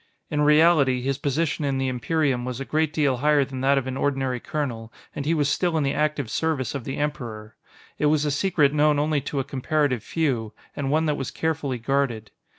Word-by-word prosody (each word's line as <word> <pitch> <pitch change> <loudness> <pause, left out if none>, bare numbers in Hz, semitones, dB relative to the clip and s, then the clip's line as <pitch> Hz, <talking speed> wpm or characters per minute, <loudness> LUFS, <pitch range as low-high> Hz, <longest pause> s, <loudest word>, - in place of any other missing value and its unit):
In 150 -1 +1
reality, 150 -4 +4
his 135 +1 -1
position 145 +2 -1
in 140 -2 0
the 135 0 0
Imperium 130 0 0
was 125 0 -4
a 135 - -4
great 155 +1 0
deal 145 -4 +1
higher 145 +1 +3
than 130 -1 -6
that 140 +1 +3
of 135 - 0
an 130 0 -4
ordinary 135 -3 -1
colonel, 115 -6 -4 0.2
and 140 - -4
he 165 - +2
was 145 -3 +1
still 165 +3 +1
in 155 - +1
the 135 0 0
active 150 -6 -1
service 145 -6 -1
of 135 -4 -5
the 135 - -4
Emperor. 115 -8 -4 0.4
It 150 - +3
was 150 0 +2
a 145 - 0
secret 150 -2 +2
known 150 0 +3
only 150 0 +1
to 140 +1 -3
a - - 0
comparative 135 -1 0
few, 125 -9 -1 0.2
and 140 -1 -2
one 155 +3 +2
that 150 -1 0
was 135 - -3
carefully 155 -5 -2
guarded. 120 -3 -1
140 Hz, 215 wpm, -24 LUFS, 130-150 Hz, 0.4 s, reality